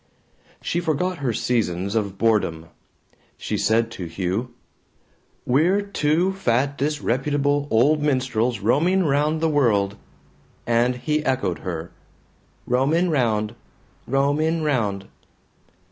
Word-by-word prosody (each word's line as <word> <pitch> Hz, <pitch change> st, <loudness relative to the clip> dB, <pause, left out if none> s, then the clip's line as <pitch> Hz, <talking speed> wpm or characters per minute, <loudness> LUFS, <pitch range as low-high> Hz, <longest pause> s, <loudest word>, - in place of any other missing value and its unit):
She 170 Hz, -, -1 dB
forgot 175 Hz, +2 st, -1 dB
her 135 Hz, -4 st, -1 dB
seasons 100 Hz, -5 st, -1 dB
of 100 Hz, -4 st, -2 dB
boredom. 90 Hz, -8 st, 0 dB, 0.7 s
She 110 Hz, -, -3 dB
said 110 Hz, +3 st, +1 dB
to 90 Hz, -, -6 dB
Hugh, 95 Hz, +8 st, -3 dB, 0.9 s
"We're 170 Hz, +11 st, +2 dB
two 180 Hz, -1 st, +1 dB
fat 140 Hz, -6 st, 0 dB
disreputable 145 Hz, 0 st, 0 dB
old 145 Hz, +7 st, +3 dB
minstrels 125 Hz, -5 st, 0 dB
roaming 170 Hz, -, +2 dB
round 150 Hz, +1 st, +1 dB
the 165 Hz, -, +2 dB
world," 105 Hz, -9 st, +1 dB, 0.7 s
and 120 Hz, +1 st, +2 dB
he 150 Hz, +5 st, -1 dB
echoed 130 Hz, -, -1 dB
her, 85 Hz, -2 st, -5 dB, 0.7 s
"Roamin' 150 Hz, +8 st, +1 dB
round 110 Hz, -6 st, 0 dB, 0.5 s
roamin' 145 Hz, +5 st, +1 dB
round." 105 Hz, -10 st, -1 dB
130 Hz, 105 wpm, -23 LUFS, 110-150 Hz, 0.9 s, old